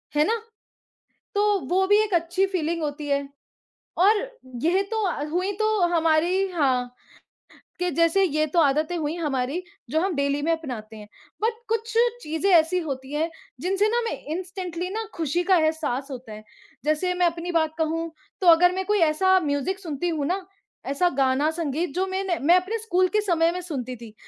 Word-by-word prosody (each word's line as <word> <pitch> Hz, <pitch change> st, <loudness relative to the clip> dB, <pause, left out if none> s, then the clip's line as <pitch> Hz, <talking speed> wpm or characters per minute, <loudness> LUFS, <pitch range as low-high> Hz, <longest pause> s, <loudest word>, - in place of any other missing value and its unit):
है 300 Hz, +1 st, +4 dB
ना? 455 Hz, 0 st, 0 dB, 0.9 s
तो 410 Hz, 0 st, +3 dB
वो 380 Hz, +2 st, +2 dB
भी 415 Hz, +2 st, +5 dB
एक 410 Hz, -4 st, -3 dB
अच्छी 350 Hz, +3 st, +2 dB
फ़ीलिंग 335 Hz, -3 st, -2 dB
होती 290 Hz, 0 st, -4 dB
है, 280 Hz, 0 st, 0 dB, 0.7 s
और 410 Hz, +5 st, +5 dB, 0.5 s
यह 365 Hz, +4 st, +3 dB
तो 440 Hz, -1 st, 0 dB
अ, 295 Hz, -4 st, -2 dB
हुई 365 Hz, +3 st, 0 dB
तो 435 Hz, -1 st, +2 dB, 0.2 s
हमारी 335 Hz, +4 st, +2 dB
हाँ, 255 Hz, -6 st, 0 dB, 0.9 s
कि 360 Hz, 0 st, 0 dB
जैसे 335 Hz, +4 st, +3 dB
ये 310 Hz, -3 st, +1 dB
तो 335 Hz, +3 st, +1 dB
आदतें 305 Hz, +3 st, +2 dB
हुई 310 Hz, +1 st, -2 dB
हमारी 290 Hz, +2 st, -2 dB, 0.3 s
जो 315 Hz, +3 st, +1 dB
हम 375 Hz, -3 st, 0 dB
डेली 280 Hz, +1 st, 0 dB
में 330 Hz, +3 st, +1 dB
अपनाते 245 Hz, -9 st, -4 dB
हैं, 210 Hz, -1 st, -11 dB, 0.3 s
बट 450 Hz, +1 st, +2 dB
कुछ 455 Hz, 0 st, -2 dB, 0.3 s
चीज़ें 320 Hz, +4 st, -1 dB
ऐसी 345 Hz, +2 st, +4 dB
होती 275 Hz, -3 st, -5 dB
हैं, 320 Hz, +3 st, 0 dB, 0.3 s
जिनसे 390 Hz, +3 st, +2 dB
ना 475 Hz, -, +1 dB
हमें 460 Hz, -1 st, -3 dB
इंस्टेंटली 365 Hz, -1 st, -5 dB
ना 445 Hz, +3 st, -3 dB
खुशी 335 Hz, +1 st, 0 dB
का 375 Hz, 0 st, +4 dB
एहसास 310 Hz, -4 st, -1 dB
होता 245 Hz, -4 st, -8 dB
है। 215 Hz, 0 st, -10 dB, 0.4 s
जैसे 310 Hz, +4 st, +1 dB
मैं 360 Hz, 0 st, +2 dB
अपनी 340 Hz, +1 st, -1 dB
बात 315 Hz, -2 st, +1 dB
कहूँ 325 Hz, +1 st, -1 dB, 0.3 s
तो 360 Hz, -, +1 dB
अगर 350 Hz, +2 st, +7 dB
मैं 380 Hz, 0 st, -2 dB
कोई 420 Hz, -1 st, +2 dB
ऐसा 375 Hz, +4 st, +4 dB
म्यूजिक 285 Hz, +7 st, -1 dB
सुनती 345 Hz, -1 st, -3 dB
हूँ 305 Hz, -4 st, -1 dB
ना, 370 Hz, +3 st, -2 dB, 0.4 s
ऐसा 315 Hz, +6 st, +1 dB
गाना, 270 Hz, +3 st, +2 dB
संगीत 320 Hz, -1 st, -2 dB
जो 375 Hz, +1 st, +1 dB
मैंने 375 Hz, -2 st, -1 dB
मैं 335 Hz, +6 st, +5 dB
अपने 380 Hz, +5 st, 0 dB
स्कूल 370 Hz, -4 st, +1 dB
के -, -, +3 dB
समय 335 Hz, -4 st, +2 dB
में 360 Hz, +1 st, -4 dB
सुनती 255 Hz, -8 st, -5 dB
थी, 225 Hz, -2 st, -12 dB
335 Hz, 185 wpm, -24 LUFS, 295-375 Hz, 0.9 s, अगर